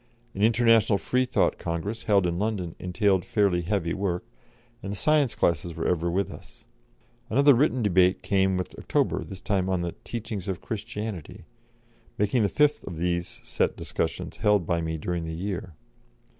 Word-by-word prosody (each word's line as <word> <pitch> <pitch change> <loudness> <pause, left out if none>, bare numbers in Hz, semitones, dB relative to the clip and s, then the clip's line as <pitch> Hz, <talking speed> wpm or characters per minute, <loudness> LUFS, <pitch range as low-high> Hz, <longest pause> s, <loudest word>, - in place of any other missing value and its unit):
An 100 - -5
International 115 -1 +4
Freethought 125 +4 +1
Congress, 90 +7 -4
held 100 -4 +3
in 85 0 -1
London, 100 -6 -2
entailed 95 0 +1
fairly 100 -4 +1
heavy 85 -1 -1
work, 95 -3 -2 0.6
and 95 - -5
the - - -3
science 145 -2 +2
classes 85 -4 0
were - - -2
ever 85 -1 +1
with 95 +1 -1
us. - - -13 0.6
Another 140 +4 +6
written 130 -1 +2
debate 95 -2 +3
came 95 -1 +2
with 90 - -4
October, - - 0
this 95 -1 -9
time 95 -3 0
on 90 -2 0
the 85 - -2
"Teachings 110 -4 -5
of 95 -3 -2
Christianity," 105 -6 -6 0.7
making 105 +4 +2
the 100 - +2
fifth 150 +4 +2
of 90 -5 -6
these 85 0 0
set - - -2
discussions - - -3
held 105 -4 +2
by 85 0 0
me 80 0 -2
during 85 +2 -3
the 80 0 -5
year. 90 -2 -4
95 Hz, 165 wpm, -26 LUFS, 85-110 Hz, 0.7 s, Another